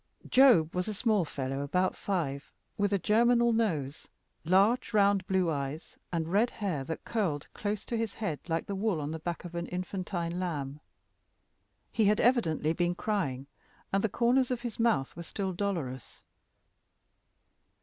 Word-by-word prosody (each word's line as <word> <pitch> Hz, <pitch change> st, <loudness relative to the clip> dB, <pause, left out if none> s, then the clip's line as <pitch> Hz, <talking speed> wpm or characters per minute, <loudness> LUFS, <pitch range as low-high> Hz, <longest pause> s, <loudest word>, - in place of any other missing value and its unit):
Job 245 Hz, -, +6 dB
was 180 Hz, +2 st, -1 dB
a 215 Hz, -, -3 dB
small 215 Hz, -3 st, +2 dB
fellow 135 Hz, -3 st, -4 dB
about 180 Hz, +6 st, 0 dB
five, 150 Hz, -8 st, -3 dB, 0.2 s
with 205 Hz, 0 st, 0 dB
a 200 Hz, -, +3 dB
germinal 235 Hz, +4 st, +3 dB
nose, 160 Hz, -11 st, -1 dB, 0.4 s
large 200 Hz, +7 st, +3 dB
round 200 Hz, -1 st, +4 dB
blue 190 Hz, -4 st, +2 dB
eyes, 140 Hz, +2 st, -4 dB, 0.2 s
and 165 Hz, -1 st, -2 dB
red 215 Hz, +5 st, +3 dB
hair 185 Hz, -, -3 dB
that 160 Hz, +4 st, -6 dB
curled 180 Hz, -11 st, -1 dB
close 210 Hz, -1 st, -3 dB
to 235 Hz, -, -3 dB
his 225 Hz, -2 st, -2 dB
head 180 Hz, -10 st, -3 dB
like 165 Hz, -1 st, -1 dB
the 200 Hz, -, -4 dB
wool 195 Hz, -3 st, 0 dB
on 145 Hz, 0 st, -3 dB
the 160 Hz, -, -4 dB
back 170 Hz, +2 st, -4 dB
of 175 Hz, -, -8 dB
an 170 Hz, 0 st, -3 dB
infantine 180 Hz, -1 st, -3 dB
lamb. 150 Hz, -6 st, -3 dB, 1.1 s
He 220 Hz, -, +2 dB
had 210 Hz, +1 st, +3 dB
evidently 165 Hz, -, +2 dB
been 175 Hz, +1 st, 0 dB
crying, 155 Hz, -12 st, -2 dB, 0.5 s
and 195 Hz, -, +2 dB
the 220 Hz, -, +2 dB
corners 245 Hz, +4 st, +2 dB
of 250 Hz, -2 st, -2 dB
his 240 Hz, -2 st, -6 dB
mouth 225 Hz, -13 st, +1 dB
were 170 Hz, -, -7 dB
still 190 Hz, +2 st, -3 dB
dolorous. 170 Hz, -10 st, -4 dB
185 Hz, 160 wpm, -30 LUFS, 160-215 Hz, 1.1 s, Job